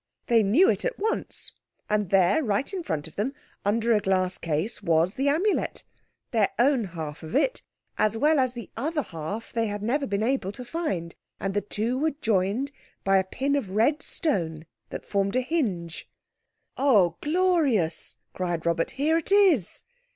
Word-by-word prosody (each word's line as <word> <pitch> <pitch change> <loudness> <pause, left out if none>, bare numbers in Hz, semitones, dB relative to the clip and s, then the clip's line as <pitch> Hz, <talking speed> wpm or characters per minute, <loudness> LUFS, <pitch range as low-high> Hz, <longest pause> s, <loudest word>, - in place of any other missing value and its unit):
They 230 -1 +4
knew 235 - +5
it - - +1
at - - -2
once, 445 +3 -2 0.4
and 210 -3 0
there, 195 - +4
right 235 - -1
in 375 - -2
front 160 - -3
of 160 - -16
them, 250 +7 -1 0.3
under 230 +3 +2
a 215 - +4
glass 185 -2 0
case, 170 +9 -2
was 170 0 +2
the 275 +2 +1
Amulet—their 290 - -1
own 250 -1 +3
half 160 -4 -6
of 160 +8 -7
it, 405 - +2 0.4
as 215 +1 +2
well 300 +4 +3
as 255 -1 +1
the 235 - -8
other 295 +5 -1
half 165 +7 -6
they 230 -1 +1
had 205 0 -4
never 275 +6 0
been 200 +1 -1
able 230 -5 0
to 250 - -8
find—and 195 - -4
the 205 - +1
two 220 +5 -2
were 310 0 0
joined 220 +4 0 0.3
by 195 0 +4
a - - +1
pin 270 +9 -1
of 205 -9 -3
red 285 +8 +3
stone 165 - -1 0.2
that - - -7
formed 200 +1 0
a 255 - +3
hinge. 210 - -2 0.7
"Oh, 205 - +4
glorious!" 300 - +1 0.2
cried 175 -3 -2
Robert. 165 0 +1
"Here 315 +4 +3
it 335 - -5
is!" 375 - +3
220 Hz, 170 wpm, -26 LUFS, 185-280 Hz, 0.7 s, knew